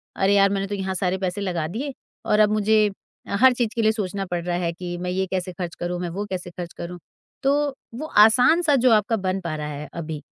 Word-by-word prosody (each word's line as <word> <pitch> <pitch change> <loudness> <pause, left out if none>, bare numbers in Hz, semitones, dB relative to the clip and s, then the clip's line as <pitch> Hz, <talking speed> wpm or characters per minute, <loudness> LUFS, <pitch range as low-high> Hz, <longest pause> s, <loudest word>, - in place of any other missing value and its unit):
अरे 195 +1 +2
यार! 200 0 +5
मैंने 195 0 -1
तो 205 - -3
यहाँ 190 -1 -3
सारे 185 0 0
पैसे 190 +1 -3
लगा 175 -5 -2
दिए 260 - -4 0.3
और 210 - +2
अब 210 -1 +5
मुझे 215 0 +3 0.4
अ, 200 - -2
हर 260 -1 +7
चीज़ 240 -2 0
के 230 - +1
लिए 220 0 +4
सोचना 200 -3 -3
पड़ 175 -1 -1
रहा 175 - -1
है 170 - 0
कि 175 0 -6
मैं 180 0 -4
ये 190 +1 0
कैसे 185 -1 -2
खर्च 175 -1 -5
करूँ, 175 0 -3
मैं 175 -1 -3
वे 200 +5 -4
कैसे 180 -1 -4
खर्च 175 0 -7
करूँ। 175 +1 -6 0.4
तो 275 +1 +3 0.4
वे 305 +5 -5 0.2
आसान 250 +10 +5
सा 300 -4 +3
जो 255 -1 +4
आपका 215 +1 +3
बन 185 +1 0
पा 170 -4 -3
रहा 150 -1 -4
है 150 0 -6
अभी, 160 -3 -5
190 Hz, 250 wpm, -23 LUFS, 175-215 Hz, 0.4 s, हर